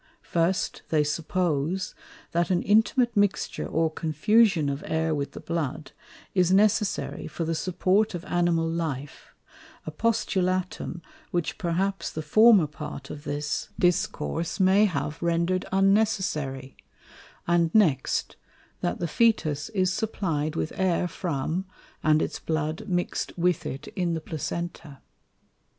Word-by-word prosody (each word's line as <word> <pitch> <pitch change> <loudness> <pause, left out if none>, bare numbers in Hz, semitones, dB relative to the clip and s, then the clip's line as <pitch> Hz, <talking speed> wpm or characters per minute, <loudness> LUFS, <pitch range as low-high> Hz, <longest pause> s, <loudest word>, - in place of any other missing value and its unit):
First, 175 +2 0
they 155 -2 +3
suppose, 165 +2 -1 0.4
that 170 0 +1
an 180 -2 +1
intimate 230 +3 +3
mixture 205 -1 0
or 160 0 +1
confusion 165 +2 +3
of 140 0 -3
Air 160 0 0
with 140 -2 -3
the - - -7
Blood, 155 -3 -3 0.4
is 180 -2 +3
necessary 210 +1 +2
for 165 - -4
the 165 - -1
support 185 +5 +1
of 175 +1 -6
Animal 175 -3 +1
Life, 155 -4 -4 0.5
a - - -4
Postulatum, 185 -3 -1 0.3
which 175 -3 -2
perhaps 190 +3 -1
the 155 - -5
former 215 +3 +6
part 150 -2 -8
of 145 +1 -9
this 145 +1 -3
Discourse 180 -1 0
may 190 +3 +5
have 150 -4 -2
render'd 170 +2 +1
unnecessary; 190 -10 +1 0.7
and 170 -1 +3
next, 155 -12 +2 0.4
that 175 - -1
the 175 - -2
Fœtus 160 -6 +1
is 185 -1 +2
supply'd 165 -8 -2
with 160 - -2
Air 180 -1 +1
from, 170 0 -2 0.4
and 155 0 +3
its - - -4
Blood 155 0 -2
mix'd 175 -1 -1
with 175 -1 +1
it 135 +3 -6
in 175 -2 -1
the 160 - -3
Placenta. 160 -2 -5
170 Hz, 130 wpm, -26 LUFS, 155-190 Hz, 0.7 s, former